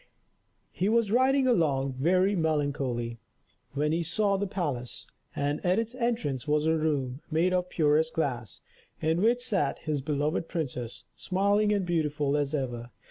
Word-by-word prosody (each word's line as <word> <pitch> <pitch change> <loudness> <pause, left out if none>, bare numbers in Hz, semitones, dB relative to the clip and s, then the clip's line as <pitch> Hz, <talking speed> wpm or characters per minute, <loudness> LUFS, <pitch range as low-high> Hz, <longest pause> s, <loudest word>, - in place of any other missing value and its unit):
He 190 - 0
was 225 -2 +2
riding 260 +3 +3
along, 145 - +2
very 185 +9 +2
melancholy, 140 -8 -1 0.5
when 150 +2 0
he 165 +2 +1
saw 200 +4 +1
the 200 +1 -1
palace; 145 - -4 0.3
and 145 +1 -1
at 180 +2 +2
its 230 +1 -1
entrance 230 - -2
was 150 0 +2
a 160 0 +3
room, 145 -4 -1
made 170 +3 +2
of 180 -1 +1
the - - -23
purest 155 0 +3
glass, 125 - -3 0.4
in 160 +3 +1
which 235 +3 +3
sat 185 - 0
his 150 -3 -2
beloved 150 +3 -1
princess, 125 -7 -4
smiling 200 +3 +1
and 200 -3 +1
beautiful 150 -4 0
as 145 0 0
ever. 120 -4 -3
155 Hz, 155 wpm, -28 LUFS, 140-190 Hz, 0.5 s, riding